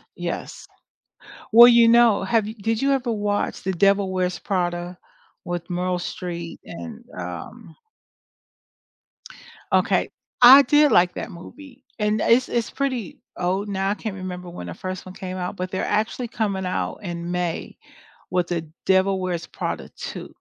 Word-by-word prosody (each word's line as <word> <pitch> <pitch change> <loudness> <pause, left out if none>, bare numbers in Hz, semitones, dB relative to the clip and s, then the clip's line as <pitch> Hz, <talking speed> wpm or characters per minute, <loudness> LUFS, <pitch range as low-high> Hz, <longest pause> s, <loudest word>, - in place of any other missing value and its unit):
Yes. - - -5 0.9
Well, 235 +2 +10
you 235 -1 +6
know, 230 -4 +5
have 215 +1 +1
yo 220 - -5
did 225 +2 0
you 275 - +2
ever 255 -3 0
watch 205 -1 -2
The 190 - -1
Devil 195 +1 +2
Wears 185 -1 -1
Prada 175 -2 -2 0.5
with 175 -1 -4
Meryl 180 0 -1
Streep 170 -1 -6
and 230 +6 -9
um - - -8 2.0
Okay, - - +2 0.3
I 260 +3 +11
did 295 +2 +4
like 175 -3 +4
that - - -5
movie 265 - -13 0.2
and 210 0 +1
it's 250 +2 +4
it's 235 -2 -1
pretty 260 -8 -3 0.2
old 185 +3 -1
now 195 -1 -1
I - - +2
can't 215 -2 -5
remember 180 -1 -7
when 130 - -8
the 85 - -6
first 185 - -6
one 185 - -10
came 185 0 -6
out, 180 +2 -4
but 185 0 -4
they're 190 - -2
actually 220 +3 -1
coming 200 -5 -2
out, 180 - -2
in 175 -1 -5
May, 175 -2 -3 0.5
with 180 -1 0
The 170 -2 -1 0.2
Devil 190 0 +3
Wears 180 -2 -3
Prada - - -5
2. - - -7
190 Hz, 155 wpm, -23 LUFS, 180-230 Hz, 2.0 s, I